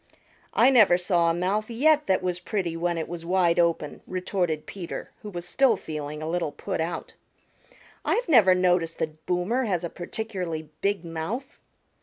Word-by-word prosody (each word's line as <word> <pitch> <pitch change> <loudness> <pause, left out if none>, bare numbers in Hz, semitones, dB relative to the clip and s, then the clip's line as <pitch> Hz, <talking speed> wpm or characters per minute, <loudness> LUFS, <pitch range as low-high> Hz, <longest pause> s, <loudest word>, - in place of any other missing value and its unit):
"I 270 - +6
never 215 -9 +6
saw 175 -2 +2
a - - +2
mouth 195 +5 -1
yet 300 +6 +3
that 190 -1 +2
was 180 -1 -1
pretty 180 -3 -2
when 170 0 -1
it 160 - -3
was 170 -1 -6
wide 175 -1 +2
open," 170 -3 0
retorted 180 -4 -2
Peter, 180 -4 -7
who 210 - -7
was 175 -2 -6
still 255 0 +3
feeling 150 -1 -6
a - - -3
little 170 -2 -1
put 145 - -4
out. 165 +2 -4 0.9
"I've - - 0
never 215 - +6
noticed 180 -2 +2
that 155 0 -5
Boomer 190 +9 0
has 180 -5 -1
a 170 - -4
particularly 175 -5 -5
big 195 -3 0
mouth." 170 +12 -5
180 Hz, 170 wpm, -26 LUFS, 165-205 Hz, 0.9 s, I